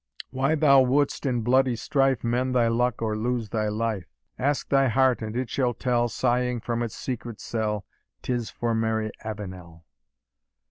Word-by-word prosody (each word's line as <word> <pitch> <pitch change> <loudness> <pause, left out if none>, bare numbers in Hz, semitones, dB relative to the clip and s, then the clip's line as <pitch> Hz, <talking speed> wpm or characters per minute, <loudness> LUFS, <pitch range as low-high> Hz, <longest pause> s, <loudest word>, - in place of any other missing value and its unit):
Why 135 +4 +1
thou 140 -3 +6
wouldst 140 +2 +1
in 120 -3 0
bloody 130 +2 +3
strife 135 +1 +1
Mend 125 +2 0
thy 120 -2 +4
luck 120 0 0
or 110 -1 0
lose 115 0 -2
thy 110 -2 -1
life? 105 -3 -2 0.3
Ask 140 +2 0
thy 135 -1 +4
heart, 130 +1 +3
and 110 0 -5
it 130 -1 -1
shall 125 -2 0
tell, 120 0 +1
Sighing 125 +2 0
from 120 +1 -2
its 115 -2 -3
secret 120 -3 -5
cell, 110 -2 -2 0.4
'Tis 120 -3 -2
for 120 -1 -2
Mary 110 -1 0
Avenel." 95 -6 -8
120 Hz, 160 wpm, -26 LUFS, 110-130 Hz, 0.4 s, thou